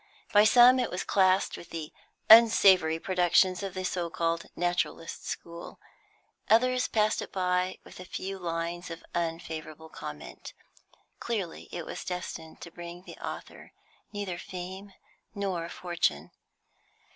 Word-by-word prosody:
By 205 +1 +7
some 245 +3 +7
it 245 - 0
was 180 - -3
classed 190 0 +2
with - - -11
the 160 -2 -6 0.3
"unsavoury 195 -7 +7
productions 180 +1 +2
of 195 -2 -5
the 185 - -3
so 175 -2 -2
called 165 -1 -1
naturalist 175 -1 -2
school;" 170 0 -7 0.7
others 255 +3 +4
passed 215 -1 +1
it - - -7
by 180 0 0
with - - -13
a 185 - -8
few 195 +1 -5
lines 170 0 -3
of 165 0 -8
unfavourable 160 -2 -4
comment. 75 - -9 0.7
Clearly 200 -8 -4
it 170 -2 -5
was - - -6
destined 175 -3 -6
to 170 - -9
bring 175 +1 -9
the - - -12
author - - -8 0.4
neither 200 -4 -4
fame 190 +2 -8 0.4
nor 185 -4 -2
fortune. 170 - -1
180 Hz, 135 wpm, -29 LUFS, 170-195 Hz, 0.7 s, By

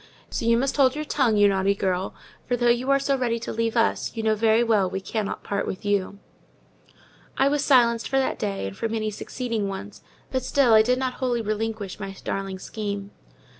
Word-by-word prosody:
So 230 - -2
you 230 0 +5
must 270 +4 0
hold 265 -1 +4
your 305 0 -3
tongue, 250 -8 +2
you 205 0 +6
naughty 195 0 +2
girl; 190 -1 -1 0.3
for, 245 - +1
though 240 0 +2
you 245 +3 -1
are 275 - +5
so 275 0 0
ready 245 -3 0
to - - -4
leave 230 +1 -1
us, 230 - +1
you 225 - -2
know 220 0 +3
very 220 +2 +3
well 210 -5 +2
we 190 - -3
cannot 205 +1 -4
part 200 0 -2
with 185 - -5
you." 200 -1 0 1.2
I 270 - +4
was 285 0 +1
silenced 235 -4 +3
for 270 - +1
that 265 - 0
day, 200 - -2
and 95 0 -6
for 225 - -2
many 215 -1 -2
succeeding 225 0 -3
ones; 195 +1 -7 0.3
but 260 - 0
still 260 -4 +3
I 220 - +8
did 250 +3 +2
not 260 -1 -1
wholly 240 -3 0
relinquish 215 -2 -3
my 195 -1 -6
darling 195 -1 -3
scheme. 200 0 -5
225 Hz, 210 wpm, -24 LUFS, 200-250 Hz, 1.2 s, I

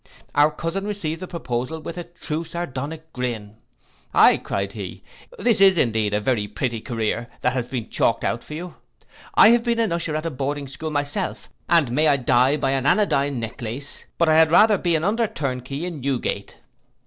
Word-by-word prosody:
Our 145 +1 +5
cousin 165 +6 -4
received 170 -6 -3
the 185 - -5
proposal 130 -2 -3
with 160 +2 -7
a 175 -1 -6
true 165 -2 -5
Sardonic 160 -1 -6
grin. 110 -4 -4 0.6
Aye, - - +7
cried 100 0 -3
he, 100 -4 -7 0.3
this 235 - +2
is 190 -2 +7
indeed 110 -6 +1
a - - +2
very 105 -1 0
pretty 115 +2 -3
career, 115 -1 -2
that 125 - +1
has 125 -2 -2
been 125 -3 -4
chalked 115 - +1
out 115 - -1
for 150 - -8
you. 175 +2 -7 0.6
I - - +8
have 235 0 +4
been 235 -1 0
an 225 -5 +1
usher 170 -2 -1
at 155 +1 -3
a 165 - -1
boarding 140 +1 -3
school 145 +4 -5
myself; 145 +6 -2 0.2
and 160 -8 +4
may 155 +5 +3
I 145 -2 +4
die 130 +2 +3
by 135 -2 0
an 135 0 0
anodyne 140 - +2
necklace, 115 +4 -4
but 170 - +3
I 155 - +5
had 160 0 +6
rather 210 +4 +5
be 170 -2 +1
an 160 - 0
under 225 +4 +1
turnkey 140 - -4
in 170 -6 -5
Newgate. 135 -1 -2
145 Hz, 195 wpm, -23 LUFS, 125-170 Hz, 0.6 s, I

